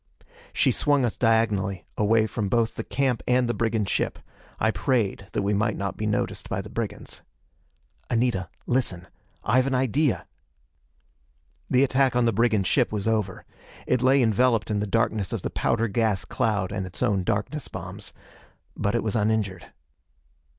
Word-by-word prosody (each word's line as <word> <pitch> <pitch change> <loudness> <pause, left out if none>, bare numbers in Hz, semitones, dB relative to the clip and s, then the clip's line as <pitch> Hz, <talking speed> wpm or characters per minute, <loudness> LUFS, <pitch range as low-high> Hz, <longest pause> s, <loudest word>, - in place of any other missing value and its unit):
She - - +2
swung 145 -3 +2
us 120 - -2
diagonally 105 -5 +1
away 110 +1 +3
from 105 -2 -3
both 115 +1 +1
the - - -5
camp 130 -5 0
and 125 0 +3
the 120 - 0
brigand 110 -3 0
ship. - - -1 0.4
I 110 - +3
prayed 100 -2 0
that - - 0
we 100 +1 +1
might 110 +1 0
not 100 0 -3
be 105 - -3
noticed 105 -1 -2
by - - -1
the - - -7
brigands. - - -5 0.9
"Anita, 115 -7 0 0.2
listen: 100 -9 -1 0.4
I've 130 +5 +3
an 135 - 0
idea!" 130 +2 +1 1.4
The 130 +1 +4
attack 130 -1 +2
on 125 -1 +3
the 115 - +2
brigand 110 -2 +2
ship - - +2
was 105 -1 -2
over. 105 -4 -1 0.4
It 125 -1 +1
lay 130 +1 +4
enveloped 115 0 +2
in 105 - +1
the 105 - -2
darkness 110 -3 0
of - - -3
the - - -3
powder 115 - +1
gas 105 -3 0
cloud 105 -4 -1
and 100 -2 -3
its 90 - -4
own 100 -6 +1
darkness 110 +11 -2
bombs. - - -7 0.6
But 100 +3 -1
it 120 - +1
was 110 +1 -2
uninjured. 105 -4 0
110 Hz, 165 wpm, -25 LUFS, 100-125 Hz, 1.4 s, The